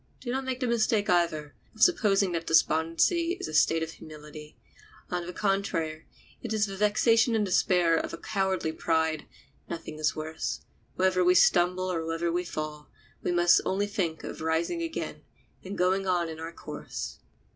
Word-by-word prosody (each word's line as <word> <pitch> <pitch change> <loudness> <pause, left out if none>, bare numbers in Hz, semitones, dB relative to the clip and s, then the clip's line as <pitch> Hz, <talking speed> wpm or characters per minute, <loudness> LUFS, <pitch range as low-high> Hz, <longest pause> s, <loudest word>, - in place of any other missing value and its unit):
Do 240 - -5
not 265 +1 -2
make 260 0 -3
the - - +1
mistake, 220 -4 +1
either, 160 -4 +1 0.2
of 220 - +2
supposing 200 - +4
that 165 -1 -3
despondency 165 - +2
is - - -4
a 155 - -7
state 160 +2 +3
of 160 - -5
humility; 150 -1 -11 0.5
on 175 -1 -2
the - - -4
contrary, 175 -5 -1 0.3
it 230 -2 -4
is 215 -1 +2
the 195 -2 -6
vexation 225 +3 +3
and 215 -2 +2
despair 180 -3 +3
of - - -3
a - - -6
cowardly 190 -5 -1
pride; 160 -1 0 0.4
nothing 160 -2 -6
is 155 0 +1
worse; 155 +1 -4 0.3
whether 185 -1 +2
we 180 +1 +4
stumble 180 +1 +3
or 165 -2 -2
whether 165 +1 -1
we 175 +1 0
fall, 155 -3 -6 0.3
we - - -1
must 175 -1 +5
only 195 +2 0
think 190 -6 -2
of - - -7
rising 160 - 0
again, 330 -1 -4 0.4
and 195 +2 -6
going 190 +2 +1
on 175 -2 +1
in 160 0 -7
our 165 +1 -6
course. - - -7
175 Hz, 175 wpm, -28 LUFS, 160-200 Hz, 0.5 s, must